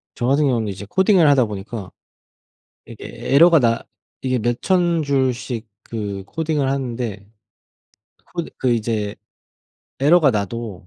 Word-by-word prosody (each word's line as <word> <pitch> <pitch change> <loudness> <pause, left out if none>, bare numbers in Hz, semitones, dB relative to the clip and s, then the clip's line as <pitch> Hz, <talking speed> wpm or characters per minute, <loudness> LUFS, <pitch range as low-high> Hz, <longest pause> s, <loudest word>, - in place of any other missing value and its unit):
저같은 135 +5 +1
경우에는 120 -5 +1
이제 100 0 -6
코딩을 190 - +4
하다 135 -4 +4
보니까 105 -1 -7 0.9
이게 - - -11 0.3
에러가 165 +3 +7
나 115 -2 +1 0.4
이게 130 -1 0
몇 120 +2 -1
1000 175 -3 +2
줄씩 130 -4 -1 0.2
그 100 -4 -5
코딩을 150 +1 -1
하는데 120 -6 -3 1.1
코드 170 -2 -4
그 130 -2 +1
이제 110 -3 -2 0.8
에러가 150 +1 +5
나도 105 -3 -4
125 Hz, 250 characters per minute, -20 LUFS, 110-145 Hz, 1.1 s, 에러가